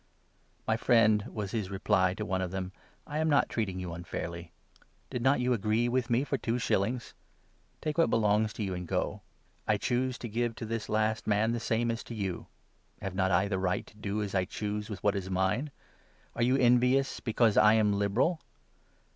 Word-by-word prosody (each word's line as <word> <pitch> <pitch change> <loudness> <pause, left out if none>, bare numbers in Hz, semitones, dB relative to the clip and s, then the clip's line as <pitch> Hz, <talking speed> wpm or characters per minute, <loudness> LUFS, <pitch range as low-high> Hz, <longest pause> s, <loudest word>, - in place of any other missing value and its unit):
' - - -39
My 110 - +2
friend,' 110 -4 +4
was 105 -3 -4
his 105 -5 -2
reply 95 -1 +1
to 105 - -4
one 95 -1 -1
of 90 - -2
them, 95 0 -4 0.2
' - - -35
I - - +1
am 160 0 +1
not 145 - +3
treat 115 - 0
13 95 -2 -6
ing - - -4
you 90 -2 -5
unfairly. 85 -1 -6 0.6
Did 125 - -3
not 135 +3 +3
you 125 0 +2
agree 110 +2 +1
with 125 0 0
me 120 +3 +2
for 140 -2 -2
two 115 +1 -1
shillings? 120 +1 -1 0.7
Take 155 +2 -2
what 165 - +4
belongs 105 0 +2
to 110 - -4
you, 95 -2 -2
and 90 -1 -5
go. - - -2 0.5
I 105 - +3
choose 125 +2 -1
to 120 - -6
give 120 +1 -1
to 115 - -6
this 115 0 -3
14 - - -4
last 110 0 0
man 110 +2 +2
the 120 - -1
same 115 +1 0
as 115 - -4
to 115 - -7
you. 95 -4 -4 0.5
Have 95 - -5
not 95 0 +1
I 95 +2 +3
the 95 -2 -1
right 90 -1 -1
to - - -18
do 105 0 -3
as 100 - -5
I 95 -1 +2
15 - - -11
choose 105 0 -3
with 100 -4 -7
what 105 -1 +2
is 95 -1 -3
mine? 95 +10 0 0.7
Are - - -3
you 125 +3 +3
envious 125 +2 +3
because 115 -2 +2
I 105 +1 +6
am 105 -2 +3
liberal 100 - +1
110 Hz, 220 wpm, -30 LUFS, 95-120 Hz, 0.7 s, I